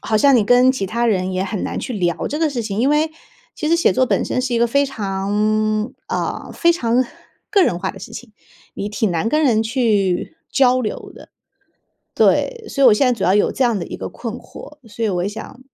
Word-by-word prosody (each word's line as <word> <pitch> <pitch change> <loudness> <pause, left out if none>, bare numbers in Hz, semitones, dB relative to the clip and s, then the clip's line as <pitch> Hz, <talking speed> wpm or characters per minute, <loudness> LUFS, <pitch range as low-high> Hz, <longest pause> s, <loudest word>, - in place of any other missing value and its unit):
好 215 - 0
像 275 +4 +5
你 220 - +3
跟 250 +3 +5
其 255 -7 -2
他 235 +5 -1
人 185 -3 0
也 185 +1 -1
很 195 0 -3
难 - - -3
去 255 - -5
聊 175 -5 -1
这 300 - -3
个 320 -1 +2
事 245 -4 -3
情。 210 -1 -4
因 260 +4 +2
为， 305 +2 +2 0.5
其 305 - -2
实 335 - +4
写 335 - +3
作 255 +6 +2
本 - - +1
身 255 - -1
是 250 -2 -2
一 - - +2
个 235 - +3
非 280 +4 +2
常， 215 0 -1
呃， - - -4
非 340 0 +3
常 245 -4 +1 0.5
个 400 -3 +4
人 175 0 -1
化 190 - -2
的 - - -13
事 - - -10
情， 240 -4 -10 0.4
你 200 - -4
挺 210 -1 -1
难 170 +6 -1
跟 305 +4 +1
人 230 -6 +3
去 220 - 0 0.2
交 255 -1 +4
流 215 - -5
的。 - - -15 0.8
对， 470 -3 +1
所 275 -1 +1
以 - - +9
我 210 - +6
现 265 +4 +2
在 250 - +3
主 195 - -2
要 185 +2 +3
有 205 - +3
这 265 - 0
样 235 -3 +1
的 170 - -5
一 - - -7
个 - - -5
困 230 -2 -6
惑， 295 +3 -12
所 225 +2 -4
以 - - +1
我 180 -2 -1
也 - - -1
想， 220 +4 -9
230 Hz, 260 characters per minute, -19 LUFS, 205-265 Hz, 0.8 s, 以